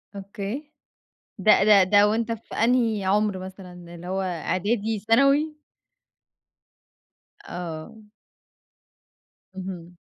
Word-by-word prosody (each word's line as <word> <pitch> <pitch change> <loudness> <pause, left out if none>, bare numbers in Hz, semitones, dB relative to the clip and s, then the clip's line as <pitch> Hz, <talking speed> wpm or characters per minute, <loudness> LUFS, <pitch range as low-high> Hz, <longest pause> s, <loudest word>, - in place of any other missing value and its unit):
أوكي. 200 +9 -6 0.7
ده 200 0 +5
ده 205 -2 +7
ده 205 +2 +5
وأنت 225 +2 -1
في 225 0 -8
أنهي 225 -3 +1
عُمر 205 0 +1
مثلًا؟ 180 -2 -10
اللي 170 +1 -10
هو 190 +1 -2
إعدادي، 200 +5 -1
ثانوي؟ 275 +8 +2 1.9
آه. 175 +5 -7 1.5
اهم. 180 -2 -8
200 Hz, 90 wpm, -24 LUFS, 185-225 Hz, 1.9 s, ده